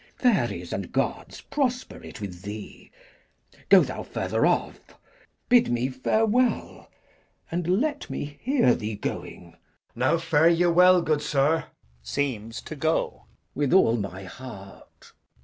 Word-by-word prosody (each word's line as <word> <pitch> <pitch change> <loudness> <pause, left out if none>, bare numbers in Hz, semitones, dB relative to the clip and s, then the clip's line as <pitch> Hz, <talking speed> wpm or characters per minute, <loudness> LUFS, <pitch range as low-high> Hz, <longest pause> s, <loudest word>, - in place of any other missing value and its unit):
Fairies 245 -6 0
and - - -4
gods - - -2
Prosper 255 -3 -2
it - - -10
with 90 -4 -7
thee! 105 +2 -9 0.8
Go - - +8
thou - - -3
further - - -1
off; - - 0 0.7
Bid 245 -1 +5
me 120 +2 0
farewell, 220 - 0 0.6
and 170 0 -2
let 295 +1 -2
me 145 0 -6
hear 255 - +3
thee 105 0 -4
going. 90 -3 -6
Edg. - - -25 0.4
Now 130 +7 +2
fare 160 -1 +3
ye 170 +1 +3
well, 180 +1 +5
good 155 -2 +1
sir. 150 +2 +1 0.4
Glou. 130 - -2 0.3
With 145 -1 0
all 120 -11 +5
my 100 -3 -5
heart. 100 -1 -12
145 Hz, 125 wpm, -25 LUFS, 110-180 Hz, 0.8 s, Go